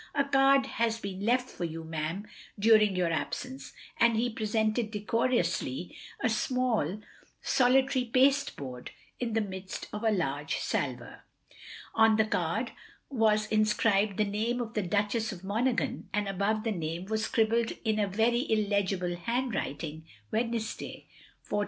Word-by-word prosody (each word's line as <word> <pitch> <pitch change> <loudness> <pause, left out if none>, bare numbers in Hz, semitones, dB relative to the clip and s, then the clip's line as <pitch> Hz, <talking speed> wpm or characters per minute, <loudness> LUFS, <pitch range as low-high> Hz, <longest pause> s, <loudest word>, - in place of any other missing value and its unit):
"A 280 - +3
card 275 -1 +4
has 230 -3 -1
been 195 -3 -5
left 250 +3 +2
for 180 - -7
you, 165 -1 -4
ma'am, 160 +5 -4 0.3
dtiring 215 -2 +5
your 175 -2 +1
absence," 255 +10 -4 0.3
and 235 -1 +4
he 240 +2 +1
presented, 220 +1 0
decorously, 205 - -1 0.3
a - - +3
small, 225 - 0 0.4
solitary 260 0 +3
pasteboard 255 - +1 0.3
in 235 -3 -2
the 225 - +2
midst 190 -2 -6
of 210 +2 -4
a 225 - +4
large 150 -7 -1
salver. - - -3 0.7
On 225 -1 +5
the 220 0 +3
card 205 +4 -1 0.4
was 215 -4 +3
inscribed 215 -2 +2
the 215 - +3
name 220 +4 -1
of 235 -2 -4
the 215 - 0
Duchess 210 +4 0
of 190 -2 -9
Monaghan, 230 +5 -1
and 205 -1 0
above 200 +3 0
the 225 - 0
name 170 -1 -3
was 220 +2 -1
scribbled 225 +1 +1
in 215 -1 +1
a 205 - +2
very 230 +6 +1
illegible 200 -4 +1
handwriting, 175 - -3 0.2
Wednesday, 230 0 -3 0.4
4.30. 205 - 0
215 Hz, 140 wpm, -29 LUFS, 195-235 Hz, 0.7 s, dtiring